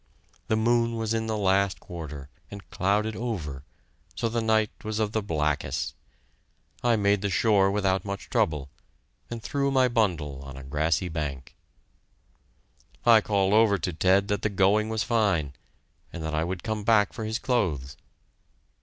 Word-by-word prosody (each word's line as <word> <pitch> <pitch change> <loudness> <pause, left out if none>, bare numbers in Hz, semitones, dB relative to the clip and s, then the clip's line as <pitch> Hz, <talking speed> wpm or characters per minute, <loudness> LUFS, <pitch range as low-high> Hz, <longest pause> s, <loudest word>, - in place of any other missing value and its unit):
The 110 - +2
moon 115 +1 +2
was 110 -1 -1
in 110 0 -1
the 110 -1 -1
last 100 -1 +2
quarter, 75 -6 -8 0.2
and 100 -1 -10
clouded 105 +3 0
over, 80 - -4 0.5
so 115 - -1
the 115 +1 -1
night 110 -1 +2
was 110 0 -3
of 110 -2 0
the 110 - 0
blackest. 75 -5 -1 0.9
I 120 -1 +4
made 100 -2 +2
the 100 - -1
shore 100 0 +3
without 95 -1 +1
much 100 -1 -6
trouble, 75 -3 0 0.6
and 115 -1 -6
threw 140 -1 0
my 130 -2 +4
bundle 85 - 0
on 70 -1 -9
a 70 - -9
grassy 75 +5 0
bank. 70 -5 -5 1.5
I 115 -2 +7
called 100 -2 +1
over 110 -2 +5
to 90 0 -3
Ted 95 +4 +3
that 105 -1 0
the 105 - 0
going 100 +2 +2
was 110 -1 -1
fine, 100 - +1 0.6
and 85 - -7
that 80 0 -3
I 80 +1 0
would 90 0 -4
come 110 -2 -3
back 105 -2 +3
for 115 - -5
his 110 +1 -2
clothes. 80 - -1
100 Hz, 165 wpm, -26 LUFS, 80-110 Hz, 1.5 s, I